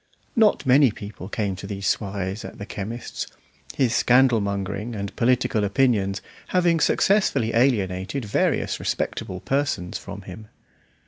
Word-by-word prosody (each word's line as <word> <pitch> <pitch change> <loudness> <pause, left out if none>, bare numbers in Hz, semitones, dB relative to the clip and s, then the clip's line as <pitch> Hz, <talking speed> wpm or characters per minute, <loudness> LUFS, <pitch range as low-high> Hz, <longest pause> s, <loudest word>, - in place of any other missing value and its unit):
Not 220 - +3
many 135 +1 +6
people 100 -2 -8
came 100 -3 -2
to 100 - -7
these 100 -1 -5
soirees 100 0 -1
at - - -9
the 100 - -6
chemist's, 115 +4 -5 0.5
his 125 -4 +2
scandal 125 -1 +4
mongering 100 +3 -3
and 100 -1 -5
political 120 -3 +2
opinions 100 -3 +1 0.2
having 175 -2 +2
successfully 150 - +2
alienated 110 -1 +1
various 105 - 0
respectable 95 0 -3
persons 135 -10 -1
from 100 0 -9
him. 95 +3 -10
105 Hz, 130 wpm, -24 LUFS, 100-130 Hz, 0.5 s, many